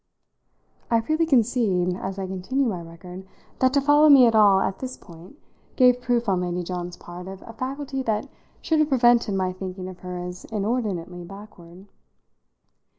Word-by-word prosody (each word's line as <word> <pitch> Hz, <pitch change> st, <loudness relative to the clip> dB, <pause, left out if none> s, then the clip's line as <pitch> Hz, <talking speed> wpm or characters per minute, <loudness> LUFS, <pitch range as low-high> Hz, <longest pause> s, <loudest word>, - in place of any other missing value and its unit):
I 230 Hz, -, +3 dB
freely 310 Hz, +7 st, 0 dB
concede, 220 Hz, -, +2 dB
as 190 Hz, +1 st, -5 dB
I 195 Hz, -, -3 dB
continue 190 Hz, +9 st, -2 dB
my 190 Hz, -8 st, -2 dB
record, 175 Hz, +3 st, -11 dB, 0.4 s
that 260 Hz, 0 st, +3 dB
to 280 Hz, -, +3 dB
follow 295 Hz, +2 st, +5 dB
me 270 Hz, -3 st, +8 dB
at 230 Hz, -, +3 dB
all, 205 Hz, -3 st, +5 dB
at 195 Hz, 0 st, -2 dB
this 255 Hz, -1 st, -6 dB
point, 175 Hz, -, -15 dB, 0.4 s
gave 250 Hz, -1 st, +4 dB
proof 240 Hz, -1 st, 0 dB
on 185 Hz, -2 st, +1 dB
Lady 180 Hz, 0 st, -2 dB
John's 175 Hz, 0 st, -5 dB
part 175 Hz, +1 st, -10 dB
of 190 Hz, 0 st, -9 dB
a 230 Hz, -, -10 dB
faculty 270 Hz, +3 st, -4 dB
that 220 Hz, -4 st, -2 dB, 0.4 s
should 320 Hz, -1 st, +1 dB
have 305 Hz, 0 st, +2 dB
prevented 240 Hz, -5 st, +3 dB
my 185 Hz, -1 st, -1 dB
thinking 185 Hz, 0 st, -7 dB
of 185 Hz, -1 st, -10 dB
her 180 Hz, -1 st, -7 dB
as 180 Hz, 0 st, -7 dB
inordinately 200 Hz, -5 st, -3 dB
backward. 190 Hz, -1 st, -13 dB
200 Hz, 170 wpm, -24 LUFS, 180-250 Hz, 0.4 s, me